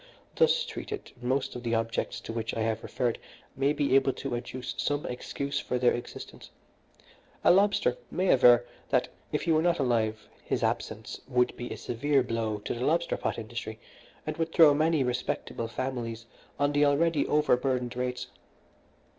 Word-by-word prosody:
Thus 480 +1 +4
treated, 420 -4 -6
most 130 +2 -1
of 125 - -5
the 115 -1 0
objects 115 0 -1
to - - -6
which 115 -1 -3
I 115 - -1
have 110 0 0
referred 120 -3 -1 0.4
may 135 +2 +2
be 145 -2 0
able 135 0 +4
to 135 -2 -5
adduce 125 +1 -5
some 145 0 0
excuse 140 +3 -3
for 125 - -2
their 125 0 +4
existence. 120 - -8 0.9
A - - +7
lobster 195 -9 +3
may 185 0 0
aver 120 -1 +6 0.2
that - - +2 0.2
if - - -1
he 165 - +1
were 155 0 +4
not 170 0 +2
alive 115 -5 0 0.2
his - - -1
absence - - -2
would 125 -2 +2
be 120 - -6
a - - -4
severe 135 +3 +1
blow 115 -3 -2
to - - -1
the 120 - -4
lobster 170 +4 +1
pot - - -2
industry, 110 -1 -6 0.5
and 155 0 -4
would 165 0 -1
throw 160 -3 +7
many 155 0 +2
respectable 125 -2 -2
families 115 -2 -4 0.3
on 145 0 +2
the 145 0 +3
already 150 +2 +3
overburdened 125 -4 +1
rates. 125 0 -2
125 Hz, 170 wpm, -29 LUFS, 120-145 Hz, 0.9 s, A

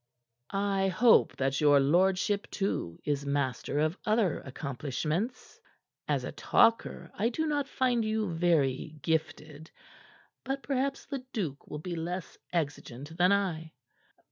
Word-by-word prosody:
"I 195 -1 +1
hope 220 +6 +4
that 135 +1 0
your 145 -1 +6
lordship, 185 +7 +2
too, 140 - -2
is 145 -1 0
master 140 -1 -1
of 155 +4 +1
other 215 -6 +2
accomplishments. 150 - -4 0.5
As - - 0
a - - -4
talker, 230 0 +2
I 220 +4 +1
do 315 +6 -1
not 290 -2 0
find 250 -4 +1
you 215 -4 -1
very 155 -3 +1
gifted. 160 -1 -2 0.7
But 270 +1 -3
perhaps 275 0 -1
Leduc 230 - -4
will 150 - -5
be 175 +3 -5
less 175 +2 -4 0.2
exigent 145 -3 -3
than 180 +2 +4
I." 170 -6 0
175 Hz, 125 wpm, -30 LUFS, 150-215 Hz, 0.7 s, your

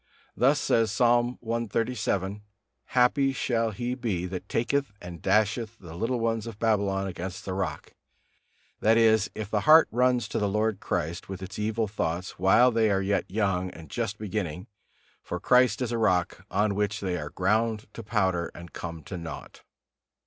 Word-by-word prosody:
Thus 135 +3 +3
says 115 -5 +2
Psalm 120 +2 +2
cxxxvii: 110 -3 -1 0.4
"Happy 135 +2 +3
shall 115 -3 0
he 120 +4 -3
be, 110 -9 -2
that 90 0 -6
taketh 135 +1 0
and 90 -1 -9
dasheth 110 +1 +1
the 85 -5 -11
little 115 +8 -1
ones 115 -1 -1
of 115 -3 -7
Babylon 100 -3 +1
against 90 0 -6
the 95 - -3
rock," 95 0 -4 0.9
that 110 +1 +4
is, 110 -2 +4
if 110 -1 -5
the 105 - +2
heart 155 +8 +7
runs 125 -2 +2
to - - -1
the 105 -1 +1
Lord 105 0 0
Christ 85 -2 -3
with 95 -1 -6
its 95 +3 -7
evil 110 +1 0
thoughts 90 -3 -3
while 95 +7 +5
they 115 -2 +2
are 95 -1 +1
yet 100 +1 0
young 95 -2 0
and 80 -5 -12
just 100 +9 -2
beginning; 95 -5 -4 0.6
for - - -5
Christ 125 -1 +3
is 120 - -3
a 120 - -1
Rock, 95 -2 +1
on 105 +1 +1
which 105 +1 -1
they 95 -2 -2
are 75 -4 -4
ground 110 +5 0
to - - -7
powder 95 -6 0
and 85 0 -11
come 85 -2 -6
to 90 - -6
naught. 80 -1 -8
105 Hz, 170 wpm, -27 LUFS, 95-115 Hz, 0.9 s, heart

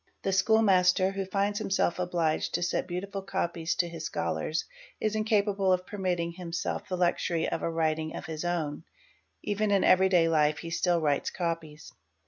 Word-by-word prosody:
The 195 - 0
school 220 +4 +4
master, 185 -1 +4
who 195 0 -3
finds 200 +1 0
himself 190 -2 0
obliged 170 -3 0
to - - 0
set 175 - -1
beautiful 195 +2 -4
copies 170 -3 -2
to 180 -3 +1
his 165 -1 -7
scholars, 85 - -2 0.3
is 215 -1 0
incapable 205 -3 +1
of 185 0 +1
permitting 180 -5 -2
himself 170 -1 -4
the 185 - -1
wm 180 - -5
Qos - - +6
SE - - +2
BE - - -14
Xury 165 -2 -1
of - - -3
a - - -1
writing 160 -1 -1
of - - -6
his 160 0 -5
own; 165 -4 -2 0.6
even 210 +1 0
in 200 -2 +3
everyday 185 -2 +5
life 150 -2 +2
he 165 +2 -7
still 175 0 +2
writes 145 -3 0
= - - -14
es. 165 -3 -4
175 Hz, 195 wpm, -28 LUFS, 165-195 Hz, 0.6 s, Qos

